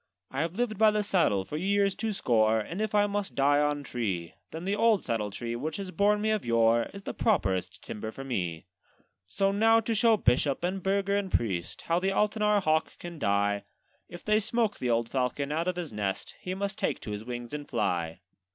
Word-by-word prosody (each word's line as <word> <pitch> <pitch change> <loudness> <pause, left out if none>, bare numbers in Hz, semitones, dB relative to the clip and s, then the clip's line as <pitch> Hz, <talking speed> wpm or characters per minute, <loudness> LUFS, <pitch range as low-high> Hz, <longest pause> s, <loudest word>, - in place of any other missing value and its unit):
'I 135 - -1
have 165 +2 -2
lived 220 -2 -1
by 220 -1 +7
the 210 0 +1
saddle 165 - +2
for 150 - -5
years 200 +3 +2
two 220 +2 -2
score; 110 - +2
And 165 - -4
if 215 -1 -1
I 205 0 +5
must 205 -1 -3
die 145 +1 +4
on 145 -1 0
tree, 100 -10 -3 0.2
Then 165 +2 -7
the 200 +2 0
old 220 -2 +3
saddle 110 -3 -1
tree, 115 +4 -4
which 150 +6 -3
has 195 -2 -5
borne 205 +2 +2
me 215 +1 +1
of 215 -2 0
yore, 115 0 +3
Is 200 0 -10
the - - -4
properest 95 - 0
timber 110 +1 -5
for 135 +5 -8
me. 90 -11 -3 0.6
'So 195 - +1
now 225 +3 +4
to 225 +1 -1
show 225 0 +4
bishop, 135 0 +2
and 185 +2 -1
burgher, 200 +1 +1
and 200 -2 -1
priest, 95 -7 -1
How 170 +1 +1
the 190 +2 0
Altenahr 210 0 +2
hawk 155 -1 +1
can 170 -2 -8
die: 100 -2 +1 0.5
If 175 - -10
they 215 0 +4
smoke 220 0 0
the 125 - -1
old 115 0 +1
falcon 135 +3 -1
out 165 +3 -1
of 180 - 0
his 175 -8 -5
nest, 100 -2 -3
He 185 0 -4
must 200 +2 -3
take - - 0
to 105 - -6
his 105 +1 -5
wings 120 +1 -6
and 145 -1 -6
fly.' 85 -7 -1
165 Hz, 215 wpm, -29 LUFS, -, 0.6 s, by